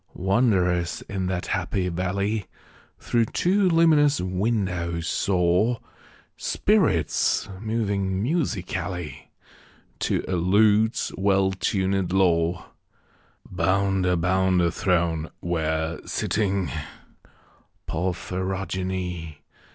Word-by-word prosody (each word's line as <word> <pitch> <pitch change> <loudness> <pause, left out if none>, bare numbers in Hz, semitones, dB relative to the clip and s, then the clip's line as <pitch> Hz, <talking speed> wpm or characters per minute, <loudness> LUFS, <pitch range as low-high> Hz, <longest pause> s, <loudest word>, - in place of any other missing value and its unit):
Wanderers 95 -4 +1
in 95 -2 -3
that 90 -1 -2
happy 95 -2 -1
valley, 100 +4 -2 0.5
Through 115 -1 +1
two 185 - +2
luminous 155 -4 +4
windows, 90 -3 -1
saw 90 +6 +1 0.6
Spirits 190 - +1
moving 100 -4 -1
musically, 95 - -3 0.7
To - - -1
a 95 - -1
lute's 105 +5 +3
well 95 0 +2
tunëd 95 -1 0
law, 85 -2 +1 0.8
Bound 95 -1 +1
about 90 +1 +2
a 85 -1 +2
throne 85 -5 0
where, 80 -1 -1
sitting 100 -3 -1 1.2
(Porphyrogene!) 90 -1 -3
95 Hz, 80 wpm, -24 LUFS, 90-100 Hz, 1.2 s, luminous